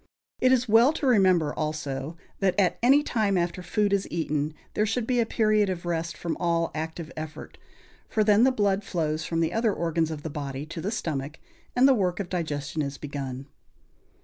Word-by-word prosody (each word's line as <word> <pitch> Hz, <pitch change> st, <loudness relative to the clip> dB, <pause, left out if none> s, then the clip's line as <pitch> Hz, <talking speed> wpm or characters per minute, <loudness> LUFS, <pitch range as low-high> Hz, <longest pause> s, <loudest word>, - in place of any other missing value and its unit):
It 255 Hz, -, +4 dB
is 250 Hz, -1 st, +3 dB
well 230 Hz, +7 st, +5 dB
to 310 Hz, -, -3 dB
remember, 185 Hz, -, +4 dB
also, 150 Hz, 0 st, -4 dB, 0.2 s
that, 195 Hz, 0 st, +1 dB
at 185 Hz, -3 st, +2 dB
any 275 Hz, +5 st, +5 dB
time 210 Hz, -8 st, +1 dB
after 175 Hz, +1 st, -1 dB
food 205 Hz, +3 st, 0 dB
is 200 Hz, -1 st, +1 dB
eaten, 155 Hz, -2 st, -2 dB, 0.2 s
there 215 Hz, -, +1 dB
should 225 Hz, +2 st, -1 dB
be 245 Hz, 0 st, +1 dB
a 230 Hz, -, +2 dB
period 215 Hz, -3 st, +2 dB
of 180 Hz, -2 st, -4 dB
rest 170 Hz, -1 st, -2 dB
from 170 Hz, -2 st, -3 dB
all 170 Hz, -1 st, 0 dB
active 160 Hz, +1 st, -5 dB
effort; 155 Hz, -1 st, -8 dB, 0.5 s
for 215 Hz, -, +2 dB
then 210 Hz, +1 st, +5 dB
the 260 Hz, -, +5 dB
blood 205 Hz, -4 st, +1 dB
flows 160 Hz, -4 st, -2 dB
from 165 Hz, -1 st, -1 dB
the 165 Hz, -, 0 dB
other 225 Hz, -1 st, +2 dB
organs 165 Hz, -3 st, 0 dB
of 155 Hz, -2 st, -6 dB
the 160 Hz, -, -4 dB
body 140 Hz, -1 st, -5 dB
to 165 Hz, +1 st, -7 dB
the 195 Hz, -, -2 dB
stomach, 150 Hz, -8 st, -3 dB, 0.4 s
and 250 Hz, +2 st, +6 dB
the 270 Hz, -, +6 dB
work 185 Hz, -6 st, 0 dB
of 190 Hz, -3 st, -4 dB
digestion 155 Hz, -4 st, -3 dB
is 140 Hz, -1 st, -4 dB
begun. 135 Hz, -2 st, -6 dB
175 Hz, 200 wpm, -26 LUFS, 155-210 Hz, 0.5 s, and